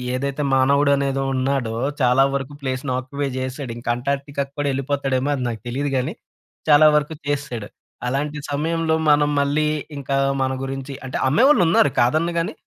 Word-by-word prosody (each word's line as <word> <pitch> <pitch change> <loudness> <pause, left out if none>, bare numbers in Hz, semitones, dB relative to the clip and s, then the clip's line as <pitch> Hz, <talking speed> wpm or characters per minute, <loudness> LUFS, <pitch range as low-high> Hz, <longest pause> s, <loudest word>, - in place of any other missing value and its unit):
ఏదైతే 140 +2 -2
మానవుడు 140 +2 +3
అనేది 135 -1 -1
ఉన్నాడో, 130 -3 0 0.3
చాలా 125 +1 +5
వరకు 140 +1 -4
ప్లేస్‌ని 130 0 -3
ఆక్యుపై 140 +2 -3
చేసాడు. 130 0 -4
ఇంకా 120 - -6
అంటార్క్‌టికా 140 +3 -2
కూడా 145 0 -1
ఎళ్ళిపోతాడు 135 0 -1
ఏమో, 135 +3 -2
అది 130 - -3
నాకు 110 -3 -6
తెలియదు 140 +4 -2
గానీ, 130 +5 -1 0.6
చాలా 150 0 +7
వరకు 150 +1 0
చేసెసాడు. 140 -7 -3 0.4
అలాంటి 145 +4 -2
సమయంలో 160 +2 0 0.2
మనం 145 0 +4
మళ్ళీ 145 +2 +1 0.3
ఇంకా 140 0 -2 0.3
మన 130 0 0
గురించి 135 +1 -5
అంటే 130 - -4
అమ్మేవాళ్ళు 255 - +5
ఉన్నారు. 150 -3 +4
కాదన్ను 155 +8 +2
గాని 165 - -1
140 Hz, 155 wpm, -21 LUFS, 130-145 Hz, 0.6 s, చాలా